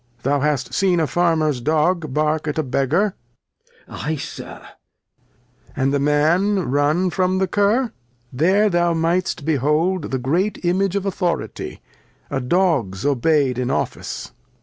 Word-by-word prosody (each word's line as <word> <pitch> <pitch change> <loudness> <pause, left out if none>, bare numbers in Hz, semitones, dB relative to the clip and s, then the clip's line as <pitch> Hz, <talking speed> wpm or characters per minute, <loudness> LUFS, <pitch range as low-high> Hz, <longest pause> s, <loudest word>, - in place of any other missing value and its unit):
Thou 140 +2 +1
hast 145 -2 -1
seen 185 -3 +2
a 160 - +2
Farmer's 155 -5 +1
Dog 155 +2 +1
bark 155 +2 0
at 150 +1 -2
a 155 - +1
Beggar. 150 +10 +1 0.7
Glost. - - -8
Ay, 160 +2 -1
Sir. 140 - -7
Lear. - - -13 1.1
And 135 +1 +1
the 140 - +2
Man 160 +5 +2
ran 150 +6 +2
from 185 0 +1
the 190 0 +1
Curr; 210 +6 +1 0.4
there 190 +10 +3
thou 175 -1 +2
might'st 165 -1 0
behold 155 +4 +1
the 130 - -1
great 175 +11 -1
Image 190 +2 +1
of 200 -1 -1
Authority, 180 -3 -3 0.5
a 135 - -1
Dog's 130 - 0
obey'd 140 -1 +2
in 125 0 -1
Office. - - -3
160 Hz, 145 wpm, -21 LUFS, 145-185 Hz, 1.1 s, there